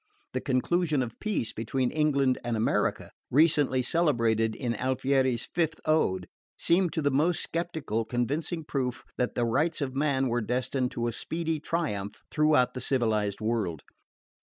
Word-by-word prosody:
The - - -1
conclusion 150 +2 +1
of 115 -2 -8
peace 210 - -2
between 120 +3 -1
England 140 -4 +2
and 120 -1 -1
America, 110 - 0 0.2
recently 145 -3 +3
celebrated 115 -8 +2
in 120 -3 -2
Alfieri's 130 0 +1
fifth 160 -2 0
Ode, 95 - +1 0.3
seemed 175 0 +2
to 160 - -1
the 145 - +2
most 160 +6 +1
sceptical 160 -9 -1
convincing 145 +9 -2
proof 130 -5 -2 0.2
that 125 - 0
the 120 - +1
rights 150 +8 +1
of 135 -3 -2
man 135 -1 +1
were 120 0 0
destined 125 +2 -1
to 120 - -2
a 120 - -2
speedy 160 +3 -2
triumph 140 -12 -3
throughout 150 -4 +3
the 125 - -5
civilised 110 -6 0
world. 105 - -1
130 Hz, 150 wpm, -28 LUFS, 115-155 Hz, 0.3 s, recently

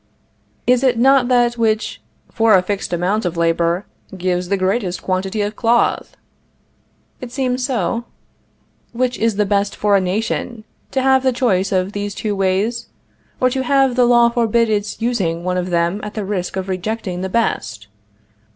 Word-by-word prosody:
Is 250 0 +3
it 255 -3 +2
not 265 +1 +4
that 240 -1 +2
which, 220 -1 0 0.3
for 225 -2 +4
a 185 - +3
fixed 200 +1 -3
amount 180 +5 0
of 175 -2 -3
labor, 170 +2 +1 0.3
gives 180 0 -1
the 200 - +1
greatest 185 -2 -1
quantity 190 +3 -1
of 205 +1 -3
cloth? 235 +1 +1 1.0
It 250 -2 -8
seems 255 -1 -1
so. 235 -2 -1 0.9
Which 250 +1 -1
is 225 -2 +1
best 200 0 0
for 205 -1 +2
a 195 - +3
nation, 215 +4 -2 0.3
to 265 - -1
have 265 0 +4
the 260 0 +2
choice 200 -7 0
of 185 0 0
these 205 -1 -4
two 210 -2 -2
ways, 200 +5 0 0.5
or 255 0 +2
to 265 +1 -1
have 270 -1 +2
the 250 -1 +4
law 240 -1 +5
forbid 230 -1 +1
its 205 0 -2
using 185 -9 -1
one 180 0 -1
of 180 0 -2
them 170 +3 0
at 210 0 -7
the 210 -2 -3
risk 190 -3 -3
of 190 0 -3
rejecting 190 -1 -3
the 190 - -3
best? 110 - -2
210 Hz, 170 wpm, -19 LUFS, 185-240 Hz, 1.0 s, law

